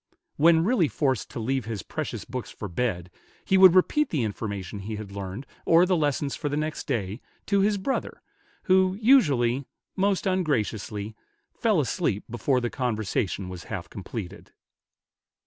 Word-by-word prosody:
When 165 +1 +5
really 200 -5 +3
forced 135 -5 -1
to - - -6
leave 130 +1 -1
his 110 -6 -4
precious - - -5
books 125 0 -5
for 105 - -7
bed, 90 -3 -2 0.3
he 190 - +2
would 190 -2 +8
repeat 300 +10 +3
the 145 -7 0
information 100 -2 -4
he 105 +3 -5
had 105 -1 -7
learned, 100 +5 -6 0.2
or 170 +2 +5
the 185 0 +2
lessons 145 -3 0
for 145 - -3
the 145 - -2
next 155 +1 -3
day, 110 -5 -2 0.2
to 200 -1 +2
his 205 +1 +2
brother, 230 +8 -3 0.4
who 185 0 +3
usually, 140 - +4 0.3
most 195 0 +1
ungraciously, 110 - -1 0.4
fell - - +2
asleep 100 - -1
before 125 +2 +1
the 120 -1 -2
conversation 110 -6 -2
was 90 -2 -8
half 95 -5 -6
completed. 100 -1 -7
130 Hz, 155 wpm, -26 LUFS, -, 0.4 s, would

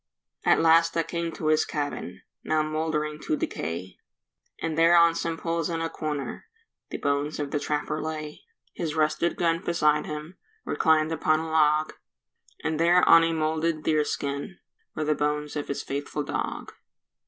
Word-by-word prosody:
At - - +4
last 165 +1 +4
I 165 - +3
came 170 0 -3
to 155 - -2
his 155 0 +4
cabin, 120 - -4 0.2
Now 155 -1 +1
mouldering 155 -1 -2
to 155 - -1
decay, 85 +4 -4 0.6
And 160 -1 -2
there 165 +2 +5
on 170 0 +6
some 165 0 -3
poles 165 -1 -2
in 165 -1 -2
a 165 0 -2
corner 150 -3 -4 0.4
The - - -4
bones 145 +1 -1
of 145 -1 -3
the 145 - 0
trapper 150 +1 -2
lay; 155 -1 -5 0.3
His 160 -2 -3
rusted 155 +2 +1
gun 165 +1 0
beside 150 -3 +2
him, 150 +4 -7 0.3
Reclined 160 -1 +2
upon 155 -1 +2
a 160 0 -5
log, 155 0 +3 0.7
And 160 -1 -1
there 175 +2 +4
on 165 - +8
a 165 - +1
moulded 160 0 -1
deer 155 -1 +2
skin 140 +6 -4 0.4
Were 155 - -1
the 155 0 +2
bones 150 0 -2
of 145 - -3
his 140 - -3
faithful 145 +1 -3
dog. - - -4
155 Hz, 165 wpm, -26 LUFS, 150-165 Hz, 0.7 s, on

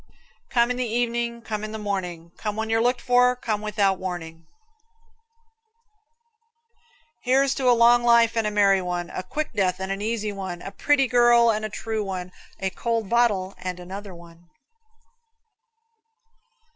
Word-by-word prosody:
Come 235 0 +2
in 250 - -2
the 255 - 0
evening, 235 0 -2
come 215 -1 -4
in 215 0 -5
the - - -4
morning, 180 -5 -4
Come 210 -1 -4
when 220 0 -3
you're 225 0 +2
looked 245 +1 +1
for, 250 0 +3
come 220 -4 -3
without 200 -3 0
warning. 165 -3 -6 2.7
Here's 270 +2 +2
to 260 -3 +1
a 240 - +5
long 240 +1 +6
life 235 -1 +4
and 225 -2 +1
a - - +1
merry 200 -2 +3
one, 175 -1 -4
A - - -4
quick 295 +12 -4
death 190 -3 0
and 190 0 -4
an 195 +1 -3
easy 215 -1 -2
one, 190 -3 -6
A 195 - -7
pretty 280 +6 +2
girl 240 -1 +5
and 215 0 -2
a 215 - -3
true 220 +1 -3
one, 185 -2 -5 0.3
A 190 0 -2
cold 230 -2 -2
bottle 205 -6 +2
and 180 -1 -5
another 190 +1 -8
one. 170 0 -16
215 Hz, 160 wpm, -24 LUFS, 190-235 Hz, 2.7 s, long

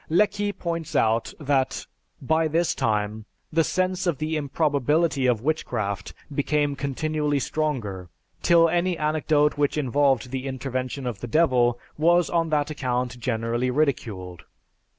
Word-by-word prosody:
Lecky 205 +4 +2
points 170 -4 -4
out 115 +1 +2
that 140 -3 0 0.3
by 160 +4 +1
this 165 +2 +1
time, 105 0 -1 0.3
"The 165 0 +4
sense 185 +2 0
of 170 -5 +1
the 155 +2 -2
improbability 145 0 +1
of 120 -3 +1
witchcraft 105 -10 -2 0.2
became 145 0 +1
continually 145 +2 -1
stronger, 120 - -2 0.3
till 170 -1 +5
any 175 +1 0
anecdote 150 -1 +1
which 145 +1 +1
involved 135 -3 +1
the 135 0 -3
intervention 130 0 -4
of 120 -5 -3
the 120 - -5
Devil 125 -4 +3 0.2
was 175 +2 +3
on 165 -1 +1
that 150 -1 0
account 125 -3 -2
generally 120 +1 -1
ridiculed. 110 - -2
145 Hz, 130 wpm, -25 LUFS, 125-160 Hz, 0.3 s, till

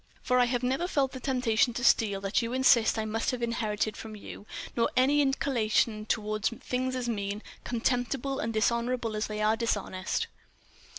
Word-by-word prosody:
For 250 0 +3
I 245 - +5
have 245 0 -1
never 265 +8 0
felt 275 -6 +1
the 260 - -7
temptation 245 -3 +1
to 245 - -3
steal 205 -6 +3
that 195 +3 +1
you 230 +1 -3
insist 255 -4 +4
I 220 - -1
must 225 +1 -1
have 250 -2 -2
inherited 215 -2 -1
from 220 -1 -8
you—nor 215 +3 -4
any 280 +3 +4
other 280 - +3
inclination 220 -5 0
toward 215 -1 -1
things 255 +2 -1
as 250 -1 -2
mean, 205 -2 -3 0.2
contemptible, 245 +3 -1
and 225 - -1
dishonourable 235 +1 0
as 215 - -1
they 215 0 -3
are 215 +1 +3
dishonest!" 205 -4 -1
235 Hz, 175 wpm, -29 LUFS, 215-255 Hz, 0.2 s, I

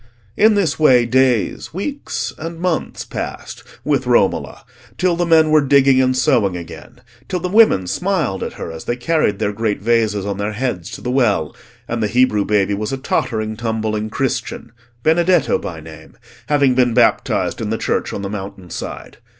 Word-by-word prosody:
In 215 +1 +4
this 195 -6 0
way 125 -6 +5
days, 130 +3 +1
weeks, 280 +9 -4
and 165 +1 -6
months 175 -2 -2
passed - - -6 0.2
with 135 -4 0
Romola 120 -6 +1 0.3
till 180 -2 +1
the 175 0 -1
men 160 -2 +4
were 155 -1 +5
digging 135 -1 +4
and 130 0 +1
sowing 110 -7 +2
again, 85 -2 -11 0.3
till 180 - -1
the 180 - -3
women 195 - +4
smiled 160 - -1
at - - -4
her - - -7
as 80 -1 -9
they 120 - -1
carried 125 -5 0
their 105 -1 -1
great 110 0 -1
vases 110 -2 +1
on 100 -1 -3
their 105 +1 -2
heads 105 -6 -3
to 125 - -9
the 125 - -3
well, 110 - +1 0.3
and 120 -1 -3
the 105 - +1
Hebrew 105 -2 +2
baby 105 -1 +1
was 105 +3 -3
a 135 - -2
tottering 110 -4 -2
tumbling 110 -1 -2
Christian, 120 -1 -3 0.3
Benedetto 170 0 +3
by 85 -4 -6
name, 80 0 -13 0.3
having 140 -3 +3
been 125 -2 +2
baptised 120 - +1
in - - -3
the - - -1
church - - -1
on 100 - -5
the - - -2
mountain 95 -3 -7
side. - - -7
120 Hz, 180 wpm, -18 LUFS, 105-150 Hz, 0.3 s, way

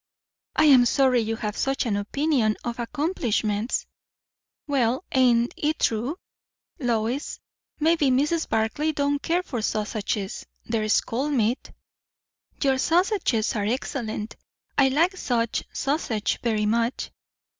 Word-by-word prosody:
"I 310 - +4
am 260 -5 +7
sorry 260 -1 +3
you 225 0 -2
have 210 -1 -4
such 270 0 0
an 215 -4 0
opinion 225 +1 +1
of 240 0 -4
accomplishments." 235 - -1 0.8
"Well, 265 0 +1
ain't 245 -2 +3
it 305 +1 -1
true? 235 +9 0 0.6
Lois, 240 +1 -1 0.4
maybe 315 -2 +3
Mrs. 295 +6 +1
Barclay 225 +8 0
don't 285 -1 0
care 350 +2 0
for 245 -10 -4
sausages. 210 -2 -2 0.2
There's 215 -2 +1
cold 275 +6 -2
meat." 235 -1 0 0.9
"Your 265 -1 +2
sausages 340 - +1
are 205 -2 -1
excellent. 220 -2 -3 0.4
I 275 - +5
like 330 +8 +2
such 235 -7 -1
sausage 260 -7 -1
very 220 -3 0
much." 230 +3 0
245 Hz, 120 wpm, -25 LUFS, 220-290 Hz, 0.9 s, am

